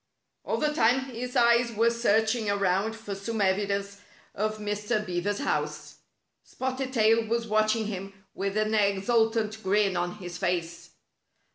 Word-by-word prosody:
All - - -1
the 300 0 0
time 245 0 +3
his 250 +2 -5
eyes 235 0 +4
were 230 +1 +2
searching 225 -1 +1
around 200 +2 +1
for 220 -2 -7
some 215 +3 -4
evidence 200 0 0 0.3
of 215 +1 -2
Mr. 210 +1 -2
Beaver's 185 +2 -2
house. - - -3 0.5
Spotted 260 0 -4
Tail 225 -2 +3
was 235 +1 0
watching 215 0 +1
him 195 -2 -5 0.2
with 195 +1 -3
an 215 0 +1
exultant 220 +2 +1
grin 195 0 +2
on 175 +1 -2
his 180 -3 -8
face. 170 0 -2
215 Hz, 140 wpm, -27 LUFS, 200-230 Hz, 0.5 s, eyes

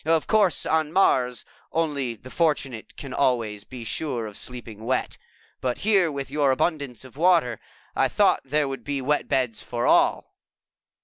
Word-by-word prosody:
Of 160 0 +2
course, 210 -5 +3
on 160 -1 +1
Mars, 125 -9 +2 0.3
only 145 -7 -1
the 130 +4 -13
fortunate 140 -8 -1
can 135 -2 -7
always 115 -6 0
be 125 0 -9
sure 120 0 -2
of 105 -1 -8
sleeping 115 -3 -5
wet, 130 +2 -1 0.4
but 125 -1 -1
here, 195 -6 +3
with 140 -2 -5
your 145 -1 +2
abundance 135 -2 -1
of 130 +1 -15
water, 165 -9 +3 0.4
I - - +3
thought - - +3
there 145 +2 0
would 135 0 -5
be 145 -1 -2
wet 145 +3 0
beds 130 -5 0
for 120 0 -3
all." - - +3
135 Hz, 165 wpm, -25 LUFS, 125-155 Hz, 0.4 s, course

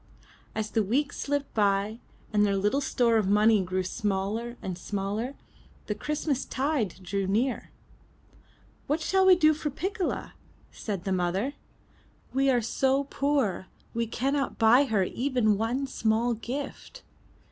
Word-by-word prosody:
As 220 -1 -2
the 225 - +2
weeks 265 +9 0
slipped 285 0 -2
by, 205 +1 +1 0.3
and 210 0 +4
their 200 -1 +2
little 205 +8 +1
store 235 -4 +2
of 210 -3 +1
money 210 +1 +5
grew 185 0 -1
smaller 210 +4 -2
and 185 -2 -4
smaller, 205 +7 -3 0.5
the 210 - -1
Christmas 290 +4 -2
tide 265 - -1
drew 195 +1 -2
near. 235 +7 0 1.2
'What 300 +3 +1
shall 380 +4 +2
we 370 - +9
do 310 -3 +5
for 305 0 -3
Piccola?'' 370 +6 -3 0.4
said 200 -5 -5
the 195 - -2
mother, 185 +8 0 0.8
we 270 +1 +3
are 245 -3 +2
so 265 +4 +1
poor, 275 -10 0 0.3
we 230 0 -1
cannot 275 +4 -1
buy 240 +5 +6
her 215 -7 +1
even 245 0 +1
one 245 +5 0
small 230 -1 +1
gift." 270 - -6
230 Hz, 140 wpm, -28 LUFS, 205-275 Hz, 1.2 s, we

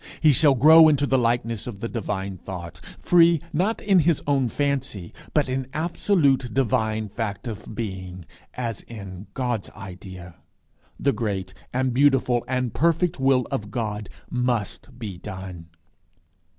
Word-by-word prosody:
He 155 - +6
shall 145 0 +5
grow 160 +5 +8
into 145 -2 +3
the 135 -2 +2
likeness 115 -2 0
of 110 -5 -7
the 115 - -3
divine 100 -4 -3
thought, 90 -2 -8 0.2
free 170 -2 +5
not 195 +8 +1
in 195 -3 +3
his 165 -1 +3
own 135 -4 +1
fancy, 135 -10 -2 0.2
but 150 -3 +2
in 130 0 -2
absolute 155 - +1
divine 110 -4 0
fact 105 +1 -4
of 105 -1 -7
being, 95 -5 -6 0.3
as 115 -4 -3
in 100 -3 -9
God's 125 -5 -2
idea. 95 -3 -10 0.6
The 140 - +2
great 105 -4 -3 0.2
and 130 0 0
beautiful 130 -3 +3
and 125 -3 -1
perfect 165 0 +1
will 135 -2 +3
of 105 -1 -3
God 105 -3 -3 0.2
must 125 0 -2
be 105 -7 -6
done. 95 -4 -8
120 Hz, 140 wpm, -24 LUFS, 100-140 Hz, 0.6 s, grow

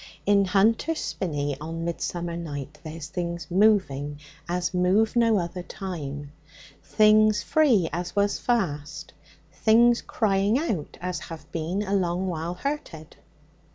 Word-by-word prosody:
'In 200 -1 +4
Hunter's 220 - +2
Spinney 145 - -2
on 165 +2 -5
midsummer 170 0 -3
night 150 -4 -6
there's 160 -2 -7
things 170 +1 -4
moving 175 -8 +2 0.3
as 175 0 -1
move 190 +6 +2
no 230 -2 +4
other 180 0 -3
time; 145 -7 -6 0.5
things 215 -2 +4
free 245 - +3
as 175 +1 -4
was 200 0 +1
fast; 165 -10 -2 0.4
things 235 +2 +4
crying 205 0 +1
out 220 - -3
as 180 0 -3
have 165 -1 -10
been 170 +5 -2
a 200 -1 -3
long 180 -1 0
while 170 -1 -3
hurted.' 180 - -5
180 Hz, 125 wpm, -25 LUFS, 165-210 Hz, 0.5 s, In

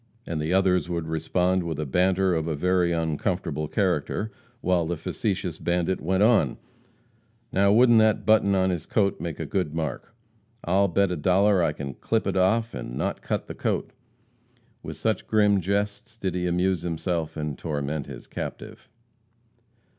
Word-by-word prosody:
And 80 -2 -3
the 80 +3 -2
others 90 -2 +2
would 85 -2 -2
respond 90 +3 +1
with 80 -3 -4
a 75 - -1
banter 95 +5 +2
of 80 -1 -1
a 80 - -1
very 90 +2 +2
uncomfortable 80 -1 -1
character, 110 +7 -1 0.3
while 90 -2 +1
the 85 0 -2
facetious 95 -1 -3
bandit 90 +1 0
went 95 +4 +1
on: 105 - +3 0.9
"Now, 100 +1 +3
wouldn't 120 +1 +6
that 110 -1 +3
button 105 -2 +4
on 95 0 +2
his 85 -3 -4
coat 100 -3 +1
make 85 -3 -5
a - - -3
good 85 -6 -2
mark. 80 - -4 0.5
I'll 95 +3 +3
bet 100 +1 +1
a - - 0
dollar 95 +4 +3
I 85 -3 +2
can 70 -2 -6
clip 110 - -1
it - - -1
off 110 +5 +2
and - - -6
not - - -2
cut - - -2
the - - -7
coat!" - - -2 0.9
With - - -7
such 110 -4 -1
grim 105 -2 +3
jests 105 +5 -2
did 95 -4 -2
he 90 0 -1
amuse 90 0 +1
himself 85 -1 -3
and 75 -2 -3
torment 75 -1 -3
the - - -9
captive. - - -7
90 Hz, 170 wpm, -25 LUFS, 80-100 Hz, 0.9 s, wouldn't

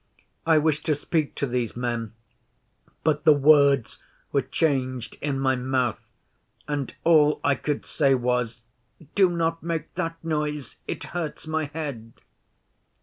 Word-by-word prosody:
I 160 -1 +6
wished 155 0 +1
to 155 - +3
speak 150 +1 -1
to - - -1
these 120 -3 -2
men, 120 -3 -2 0.9
but 150 -1 +1
the 155 -1 +7
words 140 -3 +4 0.3
were - - +2
changed 130 -6 -1
in 140 -2 -1
my 130 -1 +2
mouth, 125 -2 0 0.7
and 145 -3 -3
all 150 -3 +5
I 145 - +4
could 145 +2 -3
say 140 -3 +2
was, 125 -2 -1 0.5
"Do 195 -3 +5
not 165 -1 -1
make 165 -1 -3
that 165 0 -2
noise. 150 -4 -3
It - - -4
hurts 170 -3 -4
my 155 0 -1
head." 140 -7 -6
145 Hz, 140 wpm, -25 LUFS, 130-155 Hz, 0.9 s, the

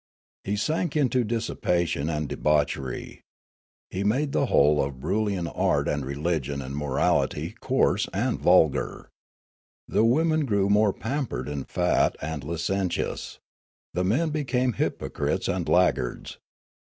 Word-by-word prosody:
He 100 - -1
sank 155 - -1
into 130 -3 +2
dissipation 90 -9 -1
and 75 -2 -2
debauchery. 70 -4 -1 0.7
He 95 - -2
made 135 +8 +1
the 140 - +1
whole 75 -4 +4
of 70 0 -4
Broolyian 95 +6 -1
art - - 0
and 75 -1 -1
religion 70 0 -2
and 70 +1 -6
morality 75 +4 0
coarse 125 -6 +1
and 120 +6 -1
vulgar. 85 -5 +2 0.8
The - - +2
women 155 +6 +3
grew 100 -3 +2
more 105 0 +4
pampered 135 +7 -3
and 75 -2 -5
fat - - +2
and 75 -2 -4
licentious; 85 +4 -2 0.6
the 90 - 0
men 140 - +1
became 130 -4 0
hypocrites - - -2
and - - -1
laggards. 60 - +1
95 Hz, 125 wpm, -26 LUFS, 75-120 Hz, 0.8 s, whole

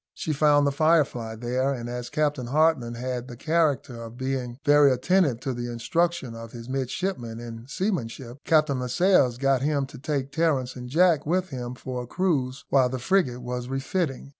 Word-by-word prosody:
She 155 - -2
found 145 0 +4
the 140 - +2
Firefly 140 -7 +2
there, 125 +4 -1
and 120 -3 -4
as 120 0 -5
Captain 150 -5 -1
Hartland 140 -4 +2
had 125 0 -4
the 120 - -8
character 150 -6 0
of 115 +1 -9
being 130 -2 -3
very 145 -1 +6
attentive 140 -1 +2
to 135 - -2
the 120 0 -4
instruction 165 +2 -1
of 115 0 -9
his 115 -1 -9
midshipmen 130 -2 -3
in 115 0 -8
seamanship, 135 - -3
Captain 155 -4 +3
Lascelles 125 -1 +3
got 135 -1 +2
him 145 -1 +1
to 135 - -12
take 140 -1 -2
Terence 145 -6 0
and 125 -1 -7
Jack 165 0 +3
with 185 +3 0
him 125 -1 -5
for 125 0 -5
a 125 - -8
cruise 140 -7 -1
while 130 -2 +4
the 130 - -3
frigate 130 -3 +1
was 125 0 -4
refitting. 135 +1 -2
130 Hz, 180 wpm, -26 LUFS, 125-155 Hz, -, very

